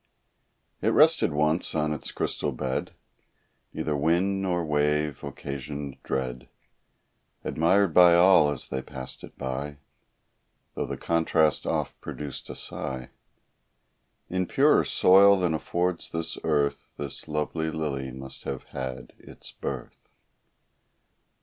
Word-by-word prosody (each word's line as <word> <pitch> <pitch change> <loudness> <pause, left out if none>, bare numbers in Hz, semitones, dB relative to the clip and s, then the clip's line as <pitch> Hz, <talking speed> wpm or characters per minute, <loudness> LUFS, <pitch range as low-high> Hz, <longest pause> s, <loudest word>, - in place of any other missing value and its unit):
It - - 0
rested - - +5
once 75 +4 +1
on 75 0 +1
its 75 - -4
crystal - - -2
bed; 65 0 -3 0.8
Neither 75 - -2
wind, 85 +7 +1
nor 90 -3 0
wave, 75 -1 0
occasioned 70 0 -6
dread; 65 -2 -3 0.9
Admired 90 +2 +2
by 85 0 +7
all 85 -4 +6
as 75 -4 -4
they 65 - -2
passed 65 -1 -7
it - - -12
by, 70 +2 -4 1.0
Though - - -3
the - - -4
contrast 80 -2 +1
oft - - -2
produced 75 -3 -6
a - - -6
sigh; 65 -2 -4 1.2
In 95 -1 -1
purer - - +4
soil 100 +2 +6
than 90 -3 +1
affords 85 +2 -1
this 80 0 -2
earth 70 -1 0
This 70 +1 -5
lovely 80 +1 -2
lily 70 -4 -3
must 65 +1 -8
have 65 -2 -4
had 65 -2 -5
its - - -11
birth. 65 -3 -7
75 Hz, 120 wpm, -26 LUFS, 70-85 Hz, 1.2 s, by